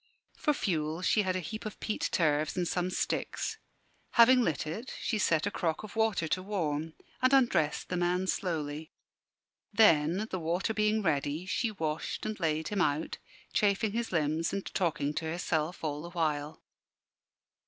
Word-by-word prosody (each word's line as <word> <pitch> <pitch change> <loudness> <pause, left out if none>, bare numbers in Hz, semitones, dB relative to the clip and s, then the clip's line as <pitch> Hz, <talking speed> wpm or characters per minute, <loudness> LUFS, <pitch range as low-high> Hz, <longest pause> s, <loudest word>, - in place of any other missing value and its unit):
For 300 - +1
fuel 165 - -1
she 215 - +4
had 185 -2 0
a - - 0
heap 215 +6 -6
of 215 -2 -7
peat 215 - -2
turves 155 -1 +1
and 175 -1 +1
some 180 +1 0
sticks. 185 - -2 0.5
Having 250 +2 +7
lit 160 - 0
it, 215 +12 -5
she 220 - -1
set 160 -4 +2
a 205 - -1
crock 165 0 -1
of 215 0 -9
water 220 -7 +1
to 185 - 0
warm, 160 -5 -2 0.3
and 255 +1 +4
undressed 240 - +2
the 180 - -1
man 180 +1 +1
slowly. 155 -4 -2 0.8
Then, 190 -2 +4
the 185 - -2
water 175 +7 -1
being 215 0 +1
ready, 150 +1 0
she 230 +4 0
washed 160 -6 -3
and 215 -1 -3
laid 160 -2 0
him 205 -2 0
out, 150 -1 0 0.3
chafing 205 +1 +2
his 230 +2 -2
limbs 160 -1 +1
and 200 -1 -3
talking 155 -5 0
to 160 - -3
herself 160 0 -2
all 150 -1 -2
the 170 - -7
while. 155 -3 -2
175 Hz, 165 wpm, -30 LUFS, 155-210 Hz, 0.8 s, Having